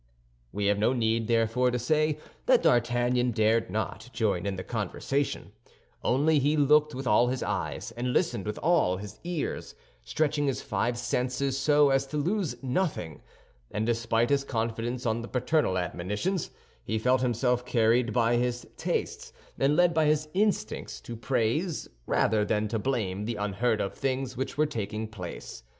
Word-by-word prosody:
We 105 - -2
have 100 0 +2
no 110 +4 +3
need, 115 -2 0
therefore, 115 +2 +2
to 125 - -1
say 155 +5 +1 0.3
that - - +5
D'Artagnan 120 +1 +2
dared 110 -1 +2
not 110 +4 -4
join 100 -6 0
in 100 - -1
the 95 - -5
conversation, 120 +6 -2 0.5
only 145 +4 +3
he 145 +3 +2
looked 150 +1 +4
with 135 +1 -5
all 120 +2 +4
his 130 +1 -1
eyes - - -3
and 120 +2 -2
listened 125 - 0
with 105 - -3
all 160 - +3
his 105 +1 -9
ears, 175 -3 -4 0.3
stretching 145 - 0
his 135 - 0
five 120 0 -1
senses 125 +2 -1
so 145 +1 +4
as 135 0 +2
to 150 - -4
lose 180 +3 0
nothing; 130 - -2 0.5
and 105 +2 -2
despite 115 +1 +1
his 140 -1 +3
confidence 115 0 -3
on 115 0 0
the 115 - -7
paternal 125 -5 +1
admonitions, 105 - -2 0.3
he 110 - -2
felt 125 +3 +2
himself 125 0 +1
carried 115 0 +2
by 120 0 +2
his 120 0 -1
tastes - - -3 0.3
and 140 +2 +3
led 175 0 +4
by 160 -1 +3
his 155 0 +1
instincts 180 - -1
to 115 - -7
praise 130 - -1 0.2
rather 110 -1 +2
than 105 +1 0
to 110 +1 -2
blame 105 -6 -1
the 115 - -2
unheard 105 +3 0
of 100 - -2
things 130 -1 -2
which 130 +2 -4
were 155 - +4
taking 110 -6 -4
place. 90 - -8
120 Hz, 165 wpm, -28 LUFS, 110-140 Hz, 0.5 s, that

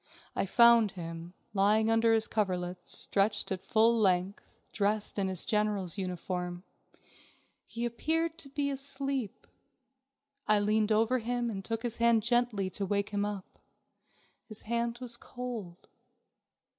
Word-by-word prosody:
I - - 0
found 235 -1 +6
him, 165 0 -7 0.2
lying 215 +2 +3
under 225 0 +4
his 225 -1 +2
coverlets, 180 -4 -2
stretched 200 +1 0
out 190 - -1
his - - -25
full 225 +1 +5
length, 190 -1 +1 0.3
dressed 210 0 0
in 195 - +1
his 185 -2 0
general's 210 -4 0
uniform. 180 -1 -4 1.0
He 235 +1 -4
appeared 320 +7 -1
to 275 - -7
be 280 +1 -1
asleep. 275 -4 -4 1.0
I 215 - +5
leaned 215 +1 +2
over 225 +4 +3
him 240 0 -1
and 195 -2 -5
took 225 +2 -3
his 240 -1 -2
hand 235 -2 +4
gently 235 -4 +1
to 200 - -2
wake 200 +1 0
him 205 -1 -1
up. 205 -2 -6 0.9
His 215 -2 -4
hand 235 +1 -1
was 240 -1 -4
cold. 235 -9 -7
215 Hz, 140 wpm, -31 LUFS, 195-235 Hz, 1.0 s, found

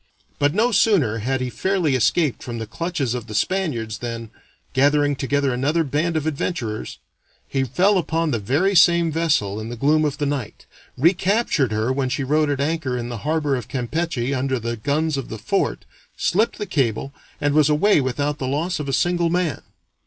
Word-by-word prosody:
But 145 +3 +2
no 230 +4 +3
sooner 160 - +3
had 130 +4 -1
he 125 -1 -2
fairly 185 -5 0
escaped 135 +4 +1
from 120 -1 -6
the 110 - -4
clutches 140 0 -2
of 120 -2 -5
the 105 - -7
Spaniards 115 - -1
than, 115 -2 -5 0.4
gathering 145 +1 +3
together 140 0 0
another 145 +7 +1
band 155 +3 0
of 155 - -2
adventurers, 135 - -3 0.5
he 135 -1 0
fell 185 - +2
upon 165 -2 -1
the 115 - 0
very 145 - +1
same 170 -2 +5
vessel 145 -11 0
in 110 +1 -6
the 120 - -5
gloom 150 +6 +2
of 145 -2 -1
the 145 - -1
night, 140 -6 -4 0.3
recaptured 180 - +2
her 110 +4 0
when 130 -1 -1
she 130 +2 -1
rode 150 +2 +2
at 140 -1 -1
anchor 145 -3 -1
in 120 0 -4
the 120 -2 -5
harbor 150 -3 +1
of 125 -4 -5
Campeche 135 0 -2
under 130 0 0
the 115 0 -3
guns 145 +6 -1
of 135 - -5
the 110 - -5
fort, 105 - -1 0.3
slipped 215 +6 +1
the 210 - -3
cable, 135 - -1 0.3
and 145 0 +1
was 155 -1 +4
away 150 +3 +4
without 145 +3 -2
the 130 - -2
loss 160 +6 -1
of 145 -2 -4
a - - -2
single 175 +5 +1
man. 170 -6 -1
145 Hz, 190 wpm, -22 LUFS, 125-165 Hz, 0.5 s, same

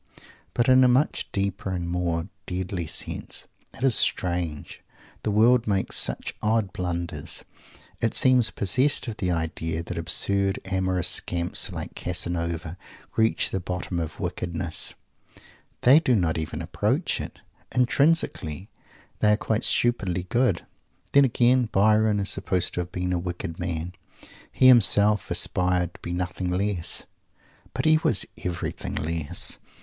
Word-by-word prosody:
But 120 - +2
in 130 0 +6
a - - +6
much 130 +4 +1
deeper 100 0 -2
and 90 -2 -3
more 85 -1 -2 0.2
deadly 90 -2 -3
sense. - - -5 0.3
It - - -8
is 135 -3 +4
strange! 85 -7 0 0.4
The - - -2
world 115 +3 +4
makes 100 -2 0
such - - -1
odd 105 -3 0
blunders. 85 -1 -4 0.6
It 115 - 0
seems 125 -3 +5
possessed 130 +9 +1
of 110 -2 -5
the 90 - -1
idea 80 -1 -2
that - - -5
absurd 100 -1 +1
amorous 95 -2 0
scamps 85 0 0
like - - -6
Casanova 85 0 -3 0.4
reach 110 0 +2
the 95 - -1
bottom 90 0 -4
of 80 -2 -5
wickedness. 85 -1 -3 0.9
They 135 +5 +7
do 130 -7 +2
not 85 -6 +1
even 80 - -5
approach - - -1
it. - - -8 0.3
Intrinsically 125 - +1 0.5
they 105 0 +4
are - - +2
quite 110 0 -1
stupidly 95 -7 +1
"good." 120 -7 +1 0.5
Then, 140 0 +6
again, 125 -1 +2
Byron 105 +1 +3
is 100 - -1
supposed 90 -2 -1
to - - -3
have 90 0 -4
been 90 0 -2
a 90 - 0
wicked 85 -1 -5
man. 85 0 -4 0.6
He - - +2
himself 105 -4 +6
aspired 90 -1 +1
to - - -15
be 85 - -6
nothing 90 +1 -3
less. 90 -1 -1 0.7
But - - -2
he 155 0 +5
was 105 - +3 0.2
everything 90 -2 -4
less. 80 -1 -1
95 Hz, 140 wpm, -25 LUFS, 85-110 Hz, 0.9 s, They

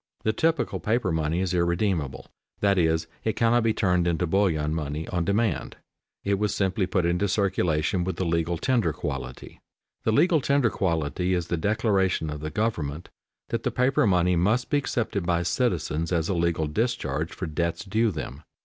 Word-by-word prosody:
The 110 - +1
typical 165 +3 0
paper 110 -3 0
money 80 +2 0
is 95 -1 -1
irredeemable, 85 -4 0 0.3
that 100 -2 +3
is, 80 -1 +2 0.2
it 110 - 0
cannot 115 +1 +3
be 115 0 +2
turned 90 -5 +1
into 85 +1 +1
bullion 80 -4 +1
money 75 0 -3
on 90 -2 -1
demand. 105 +2 0 0.5
It 100 -1 0
was 105 -1 0
simply 95 -1 0
put 90 -1 +1
into 90 +4 +1
circulation 90 -4 +1
with 95 +1 -2
the 95 - -2
legal 85 0 0
tender 110 - +1
quality. 65 -2 -6 0.4
The 110 - +2
"legal 165 +6 +4
tender" 140 -4 +2
quality 90 +1 0
is 85 -1 -3
the - - +1
declaration 100 -4 +1
of 75 - -5
the 75 +1 -4
government 85 -6 -2 0.4
that - - -1
the - - 0
paper 130 +1 +2
money 90 -1 +3
must 110 +9 +1
be 145 - +4
accepted 110 -8 -2
by 85 0 +1
citizens 85 -4 -1
as 85 -2 0
a - - +1
legal 85 -2 +1
discharge 80 - -1
for 95 - -5
debts 85 +3 -2
due 110 +4 +2
them. 75 -5 -6
90 Hz, 175 wpm, -26 LUFS, 80-105 Hz, 0.5 s, legal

